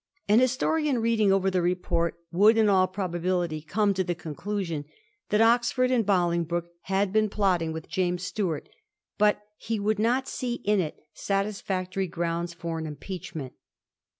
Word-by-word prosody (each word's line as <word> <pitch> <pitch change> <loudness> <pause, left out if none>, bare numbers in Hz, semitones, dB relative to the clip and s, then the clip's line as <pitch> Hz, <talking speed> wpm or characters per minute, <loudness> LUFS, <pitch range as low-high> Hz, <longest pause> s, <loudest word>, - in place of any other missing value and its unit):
An 210 +3 +6
historian 265 +3 +1
reading 225 -3 +2
over 195 0 +2
the 185 -1 +1
report 175 -1 0 0.2
would 210 +6 +5
in 220 -1 +4
all 185 -2 +4
probability 175 -3 -2
come 200 +6 +1
to 190 0 0
the 175 -1 -2
conclusion 170 -1 -4 0.4
that 210 +1 +3
Oxford 240 +2 +3
and 245 -3 +3
Bolingbroke 170 -3 0
had 195 0 0
been 215 -1 +3
plotting 185 -6 +1
with 160 0 -6
James 180 -1 -1
Stuart, 180 -5 -2 0.5
but 210 0 +3
he 225 -1 -3
would 210 +1 0
not 245 +4 +1
see 245 -2 -3
in 210 0 +3
it 160 -4 -2 0.2
satisfactory 195 -2 -2
grounds 170 0 -2
for 170 -1 -5
an 160 - -4
impeachment. 155 -2 -7
190 Hz, 150 wpm, -27 LUFS, 170-210 Hz, 0.5 s, An